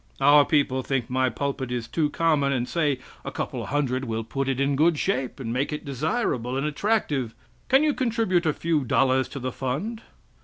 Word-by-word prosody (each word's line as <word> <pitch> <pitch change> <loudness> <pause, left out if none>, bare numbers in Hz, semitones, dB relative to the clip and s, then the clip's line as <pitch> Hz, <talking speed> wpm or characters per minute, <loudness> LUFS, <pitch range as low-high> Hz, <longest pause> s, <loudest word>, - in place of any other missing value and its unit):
Our 145 +1 +6
people 140 -4 +1
think 130 -2 -2
my 130 0 +2
pulpit 135 +1 -3
is 120 -2 -3
too 150 +3 0
common, 150 -3 +2
and 125 -2 -1
say 150 -5 +1 0.3
a - - -4
couple - - -4
hundred 135 -2 0
will 115 -1 -2
put 135 +4 -2
it 135 -1 -1
in 140 0 +2
good 160 +3 +3
shape, 130 -2 -1
and 115 -3 -3
make 135 +4 -1
it 150 - -5
desirable 135 - -1
and 135 - -1
attractive. 150 - 0 0.3
Can 270 +3 +5
you 305 -1 +3
contribute 225 -10 +1
a - - +4
few 160 -2 0
dollars 130 +1 +2
to - - -8
the 130 0 -3
fund?" 155 - -3
140 Hz, 195 wpm, -25 LUFS, 130-155 Hz, 0.3 s, Our